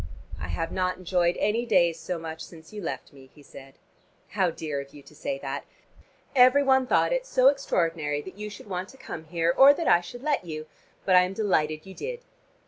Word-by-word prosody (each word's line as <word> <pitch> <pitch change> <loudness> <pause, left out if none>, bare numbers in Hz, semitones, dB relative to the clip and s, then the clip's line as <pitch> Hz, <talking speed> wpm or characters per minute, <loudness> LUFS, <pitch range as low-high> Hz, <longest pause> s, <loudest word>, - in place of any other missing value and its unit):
"I 75 - -5
have 165 - -3
not 185 -1 -1
enjoyed 180 -1 +1
any 225 +3 +1
days 170 -8 +3
so 170 +2 -4
much 160 -1 -7
since 160 +2 -13
you 210 - -6
left 165 - -5
me," 135 -1 -16
he 145 - -16
said. 135 -1 -13 0.5
"How 190 -2 +1
dear 150 -4 -4
of 140 +1 -14
you 145 - -12
to - - -17
say 275 - -4
that! - - -5 0.7
Every 255 +2 +6
one 265 -1 +3
thought - - +3
it - - -1
so 260 - +5
extraordinary 165 - 0
that 190 - -10
you 210 +1 -6
should 210 0 -11
want 185 0 -4
to 265 - -15
come 160 -11 -8
here 170 +1 0
or 275 +2 +8
that 335 - -3
I 175 - +5
should 240 +8 -10
let 295 -8 0
you, 155 -2 -6 0.4
but 185 - +4
I 180 - +8
am 180 +1 -1
delighted 155 -7 0
you 190 - -10
did." 480 - -6
180 Hz, 220 wpm, -26 LUFS, 160-245 Hz, 0.7 s, or